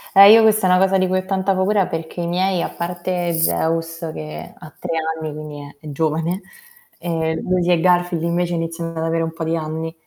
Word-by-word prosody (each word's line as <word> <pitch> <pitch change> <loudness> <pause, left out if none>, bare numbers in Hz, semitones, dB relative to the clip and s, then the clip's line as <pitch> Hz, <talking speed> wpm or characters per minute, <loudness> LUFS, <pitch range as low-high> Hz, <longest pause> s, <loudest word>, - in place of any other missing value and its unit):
Eh 200 +1 +10
io 225 - +8
questa 215 -3 +4
è - - +2
una 180 0 +5
cosa 190 0 +3
di 185 - +2
cui 185 +1 +1
ho 185 - -6
tanta 190 0 0
paura 190 +1 +2
perché 165 +2 -5
i 170 - -2
miei, 180 +1 0
a - - -2
parte 175 0 -3
Zeus 165 0 0
che 75 +1 -8
ha 155 - -13
3 180 - -4 0.3
anni, 155 -1 -4
quindi 150 -1 -8 0.2
è - - -16
è 150 - -6
giovane, 160 +5 -1 0.6
ehm, 160 -2 -2
Lucy 180 -1 +1
e 170 - +4
Garfield 175 -2 +2
invece 175 +1 0
iniziano 165 0 -3
ad 160 -1 -4
avere 165 0 0
un 160 - -3
po' 165 0 -5
di 160 +1 0
anni. 160 +1 -4
170 Hz, 220 wpm, -20 LUFS, 160-185 Hz, 0.6 s, Eh